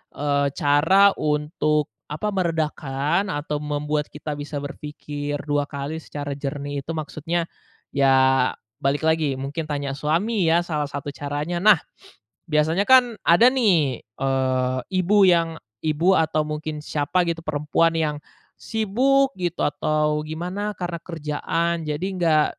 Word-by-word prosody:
eee, 140 Hz, -1 st, +1 dB
cara 160 Hz, +8 st, +5 dB
untuk 150 Hz, -1 st, 0 dB, 0.2 s
apa, 155 Hz, +8 st, -3 dB
meredakan 160 Hz, -1 st, -1 dB
atau 150 Hz, -3 st, -3 dB
membuat 150 Hz, 0 st, -2 dB
kita 150 Hz, +1 st, -7 dB
bisa 145 Hz, 0 st, -5 dB
berpikir 145 Hz, 0 st, -5 dB
dua 145 Hz, -1 st, 0 dB
kali 145 Hz, +2 st, -5 dB
secara 145 Hz, -2 st, -6 dB
jernih 145 Hz, 0 st, -4 dB
itu 140 Hz, +4 st, -6 dB
maksudnya, 160 Hz, +2 st, -2 dB, 0.5 s
ya 135 Hz, -2 st, +4 dB, 0.3 s
balik 145 Hz, +1 st, 0 dB
lagi, 160 Hz, -3 st, +2 dB
mungkin 140 Hz, +4 st, -4 dB
tanya 145 Hz, -2 st, -2 dB
suami 170 Hz, +8 st, 0 dB
ya, 170 Hz, +2 st, +3 dB
salah 150 Hz, -4 st, -2 dB
satu 140 Hz, 0 st, -5 dB
caranya. 145 Hz, +4 st, -3 dB
Nah, 210 Hz, +1 st, +6 dB, 0.7 s
biasanya 160 Hz, +5 st, +2 dB
kan 250 Hz, -3 st, +6 dB
ada 175 Hz, +8 st, +6 dB
nih, 170 Hz, -, +2 dB
eee, 130 Hz, +1 st, -1 dB
ibu 190 Hz, +2 st, +3 dB
yang 165 Hz, -2 st, +2 dB, 0.3 s
ibu 165 Hz, +5 st, +3 dB
atau 155 Hz, -1 st, +1 dB
mungkin 150 Hz, 0 st, -5 dB
siapa 150 Hz, +5 st, 0 dB
gitu, 165 Hz, 0 st, -2 dB
perempuan 155 Hz, +2 st, +1 dB
yang 155 Hz, -2 st, 0 dB, 0.4 s
sibuk 260 Hz, +6 st, +1 dB
gitu 175 Hz, -1 st, -2 dB
atau 150 Hz, +1 st, 0 dB
gimana 180 Hz, +6 st, -3 dB
karena 175 Hz, -1 st, -3 dB
kerjaan, 165 Hz, +1 st, -2 dB
jadi 150 Hz, +4 st, -2 dB
enggak 165 Hz, -5 st, +3 dB
150 Hz, 130 wpm, -23 LUFS, 145-170 Hz, 0.7 s, Nah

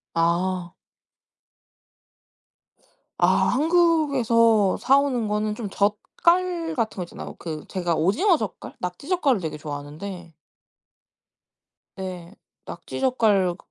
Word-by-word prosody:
아. 175 Hz, +1 st, 0 dB, 2.5 s
아 -, -, +4 dB
한국에서 265 Hz, -, +3 dB
사오는 265 Hz, -5 st, +2 dB
거는 210 Hz, 0 st, -1 dB
좀 215 Hz, -2 st, -5 dB
젓갈 335 Hz, -, 0 dB
같은 225 Hz, -4 st, -2 dB
거 185 Hz, -, -3 dB
있잖아요. -, -, -9 dB
그 155 Hz, -3 st, -6 dB
제가 175 Hz, -3 st, -1 dB
오징어 300 Hz, -, +3 dB
젓갈, 215 Hz, -6 st, -6 dB
낙지 180 Hz, -, -6 dB
젓갈도 285 Hz, -, +2 dB
되게 160 Hz, -2 st, -5 dB
좋아하는데 155 Hz, +4 st, -7 dB, 1.7 s
네. 185 Hz, 0 st, -7 dB, 0.3 s
낙지 -, -, -7 dB
젓갈 210 Hz, -9 st, +2 dB
그 -, -, -24 dB
210 Hz, 205 characters per minute, -24 LUFS, 180-275 Hz, 2.5 s, 아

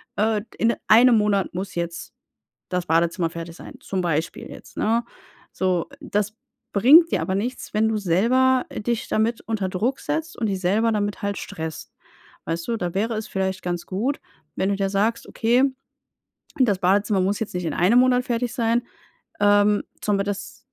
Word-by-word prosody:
äh, 215 Hz, 0 st, +1 dB
d -, -, -15 dB
in 230 Hz, +1 st, +2 dB
einem 235 Hz, +1 st, +7 dB
Monat 205 Hz, -3 st, +1 dB
muss 185 Hz, +1 st, -5 dB
jetzt 170 Hz, -1 st, -4 dB, 0.6 s
das 180 Hz, -1 st, -1 dB
Badezimmer 165 Hz, +1 st, +1 dB
fertig 165 Hz, 0 st, -8 dB
sein.“ -, -, -11 dB
Zum 190 Hz, -, -3 dB
Beispiel 165 Hz, -1 st, -2 dB
jetzt, -, -, -13 dB
ne, 230 Hz, +2 st, +1 dB, 0.5 s
so, 185 Hz, -2 st, 0 dB
das 210 Hz, -7 st, -2 dB, 0.4 s
bringt 295 Hz, -, +7 dB
dir -, -, 0 dB
aber 190 Hz, -, -1 dB
nichts, 235 Hz, +6 st, -3 dB
wenn 215 Hz, +1 st, +2 dB
du 220 Hz, -, 0 dB
selber, 240 Hz, +8 st, +2 dB
äh, -, -, -6 dB
dich 235 Hz, +1 st, -2 dB
damit 225 Hz, +2 st, 0 dB
unter 210 Hz, -4 st, -2 dB
Druck 230 Hz, +9 st, -1 dB
setzt 320 Hz, +2 st, -3 dB
und 230 Hz, -, -1 dB
dich 190 Hz, -2 st, -2 dB
selber 215 Hz, +5 st, +2 dB
damit 205 Hz, +1 st, -2 dB
halt 200 Hz, 0 st, -2 dB
stresst, 160 Hz, -5 st, -7 dB, 0.5 s
weißt 165 Hz, +3 st, -4 dB
du? 230 Hz, -, 0 dB
Da 175 Hz, -4 st, -3 dB
wäre 220 Hz, +4 st, 0 dB
es 215 Hz, -, -4 dB
vielleicht 190 Hz, -1 st, -2 dB
ganz 175 Hz, -1 st, -3 dB
gut, 235 Hz, +10 st, -2 dB, 0.4 s
wenn 190 Hz, -, 0 dB
du 200 Hz, -, +1 dB
dir 195 Hz, -1 st, -1 dB
sagst: 215 Hz, +4 st, 0 dB
„Okay, 245 Hz, +3 st, +2 dB, 0.9 s
das 210 Hz, -8 st, +3 dB
Badezimmer 200 Hz, +2 st, +2 dB
muss 195 Hz, +3 st, 0 dB
jetzt 215 Hz, -, -4 dB
nicht 180 Hz, -1 st, -2 dB
in 160 Hz, -, -2 dB
einem 195 Hz, +8 st, +4 dB
Monat 250 Hz, -1 st, +3 dB
fertig 240 Hz, -1 st, -1 dB
sein, 235 Hz, -1 st, +1 dB, 0.6 s
ähm, 205 Hz, 0 st, +4 dB, 0.2 s
sondern 200 Hz, -1 st, +1 dB
das 205 Hz, +3 st, -5 dB
205 Hz, 180 wpm, -23 LUFS, 185-230 Hz, 0.9 s, einem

